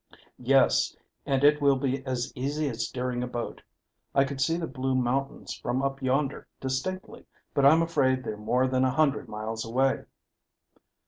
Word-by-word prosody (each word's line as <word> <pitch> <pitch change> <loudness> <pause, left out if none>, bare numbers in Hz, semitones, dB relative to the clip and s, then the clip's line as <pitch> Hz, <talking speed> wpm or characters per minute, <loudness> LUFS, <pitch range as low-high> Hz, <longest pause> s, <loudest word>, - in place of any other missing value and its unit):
"Yes, 135 +1 +3 0.3
and 135 0 +1
it 150 +1 +5
will 140 -1 +5
be 135 0 -1
as 125 -2 -2
easy 145 +4 -1
as 115 -2 -3
steering 125 -1 -3
a 125 - -2
boat. 120 -1 -5 0.5
I 135 - +6
could 135 -1 -4
see 165 +4 +2
the 170 - -2
blue 130 -2 -2
mountains 130 +2 -1
from 125 +2 -2
up 135 0 -2
yonder 135 +2 0
distinctly, 135 +9 -4 0.3
but 140 -1 +5
I'm 160 +3 +6
afraid 135 -6 +1
they're 110 - -4
more 120 +5 +1
than 130 0 +1
a 130 - +3
hundred 140 +1 +1
miles 110 +1 -4
away." 130 +4 +1
130 Hz, 170 wpm, -27 LUFS, 125-140 Hz, 0.5 s, I